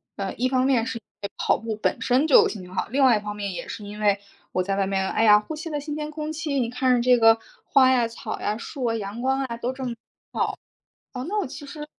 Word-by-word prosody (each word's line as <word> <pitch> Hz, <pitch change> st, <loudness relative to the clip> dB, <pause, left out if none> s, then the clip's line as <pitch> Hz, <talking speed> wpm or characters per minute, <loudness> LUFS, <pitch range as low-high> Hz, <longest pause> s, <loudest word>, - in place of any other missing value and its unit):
呃， 195 Hz, -1 st, -3 dB
一 255 Hz, +2 st, 0 dB
方 255 Hz, 0 st, +2 dB
面 255 Hz, -4 st, +2 dB
是 255 Hz, -1 st, -4 dB
因 225 Hz, -, -12 dB, 0.2 s
为 200 Hz, -, -4 dB
跑 -, -, +2 dB
步 225 Hz, -1 st, -4 dB
本 215 Hz, -, -1 dB
身 260 Hz, +4 st, +3 dB
就 285 Hz, -, +7 dB
心 210 Hz, -, -6 dB
情 180 Hz, 0 st, -12 dB
好， -, -, -1 dB
另 275 Hz, +4 st, +2 dB
外 250 Hz, -4 st, +6 dB
一 -, -, -5 dB
方 210 Hz, 0 st, -5 dB
面 200 Hz, -2 st, -4 dB
也 -, -, -6 dB
是 210 Hz, -, -7 dB
因 205 Hz, +1 st, -8 dB
为 205 Hz, -1 st, +3 dB, 0.3 s
我 185 Hz, -, 0 dB
在 195 Hz, +1 st, -1 dB
外 195 Hz, -1 st, +1 dB
面， 190 Hz, -1 st, 0 dB
哎 -, -, +1 dB
呀， 210 Hz, -1 st, +7 dB
呼 260 Hz, +9 st, -7 dB
吸 315 Hz, +2 st, -6 dB
了 295 Hz, -2 st, -2 dB
新 295 Hz, +1 st, -5 dB
鲜 300 Hz, 0 st, -4 dB
空 305 Hz, 0 st, -4 dB
气， 315 Hz, -3 st, -3 dB
你 235 Hz, -2 st, 0 dB
看 250 Hz, +1 st, +2 dB
着 240 Hz, -, +1 dB
这 250 Hz, 0 st, +4 dB
个 225 Hz, 0 st, +6 dB, 0.3 s
花 260 Hz, -1 st, +5 dB
呀、 245 Hz, -3 st, +3 dB
草 230 Hz, -, -6 dB
呀、 210 Hz, -, -1 dB
树 260 Hz, +3 st, -7 dB
啊、 230 Hz, -1 st, +1 dB
阳 210 Hz, +1 st, -5 dB
光 265 Hz, +1 st, +1 dB
啊 235 Hz, -2 st, -5 dB
都 240 Hz, +2 st, -2 dB
这 260 Hz, 0 st, -7 dB
么 245 Hz, -2 st, -2 dB, 1.2 s
好， 250 Hz, -1 st, -4 dB
那 405 Hz, +6 st, -2 dB
我 400 Hz, -, -1 dB
其 285 Hz, +3 st, -9 dB
实 295 Hz, +1 st, -7 dB
240 Hz, 295 characters per minute, -24 LUFS, 210-270 Hz, 1.2 s, 就